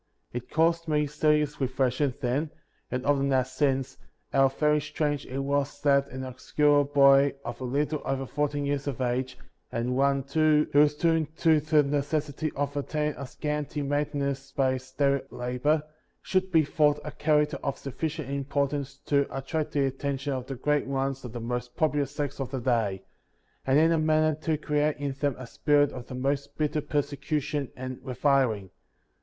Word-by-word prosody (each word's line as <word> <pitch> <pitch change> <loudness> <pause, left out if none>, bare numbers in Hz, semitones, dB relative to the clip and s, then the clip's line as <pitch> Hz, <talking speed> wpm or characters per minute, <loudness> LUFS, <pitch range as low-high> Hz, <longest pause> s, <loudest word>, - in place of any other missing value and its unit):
23. - - -4
It - - -30
caused 165 +1 +2
me 150 -1 +2
serious 150 0 +1
reflection 130 +1 +1
then, 135 +6 0 0.4
and 125 0 -3
often 140 -1 +2
has 130 -1 +1
since, 135 -2 0 0.3
how 135 0 +5
very 150 +2 +1
strange 145 -1 -2
it 130 - -5
was 140 +1 -1
that 140 -1 +4
an 130 -1 -6
obscure 145 +3 +2
boy, 140 0 +5
of 120 +1 -6
a - - -2
little 145 +4 -1
over 135 0 -2
fourteen 145 +1 -1
years 140 0 -1
of 135 -3 -3
age, 125 +1 -1 0.3
and 120 +2 -1
one, 140 0 +2
too, 150 +2 +3
who 145 - +6
was 150 0 +5
doomed 160 -1 0
to 160 -2 +4
the 155 0 +3
necessity 145 +1 -1
of 145 0 -2
obtaining 150 +1 -1
a 140 - -6
scanty 150 +1 -3
maintenance 140 -1 -2
by 135 -2 +2
his 130 0 -7
daily 140 0 +2
labor, 125 +5 0 0.4
should 190 0 0
be 160 -3 +4
thought 150 0 +2
a 150 - -4
character 150 0 +1
of 140 - -2
sufficient 155 +2 -4
importance 140 0 -2
to 140 -1 +2
attract 150 +3 -3
the 140 -2 +2
attention 140 +1 -2
of 130 -1 -4
the 135 - -4
great 150 +3 0
ones 135 0 -2
of 125 - -7
the 120 - -6
most 120 +1 -4
popular 150 -3 +1
sects 145 +1 -4
of 135 -2 -3
the 135 -1 -3
day, 115 -6 0 0.6
and 135 +1 +4
in 160 +2 +5
a 165 - +3
manner 155 0 +3
to 155 +1 -1
create 150 0 0
in 140 -1 -2
them 140 -2 0
a 130 - -7
spirit 145 +4 +2
of 125 -1 -8
the 125 - -7
most 140 +2 -2
bitter 150 0 0
persecution 145 -1 -2
and 130 0 -6
reviling. 125 -7 +1
140 Hz, 180 wpm, -27 LUFS, 135-150 Hz, 0.6 s, who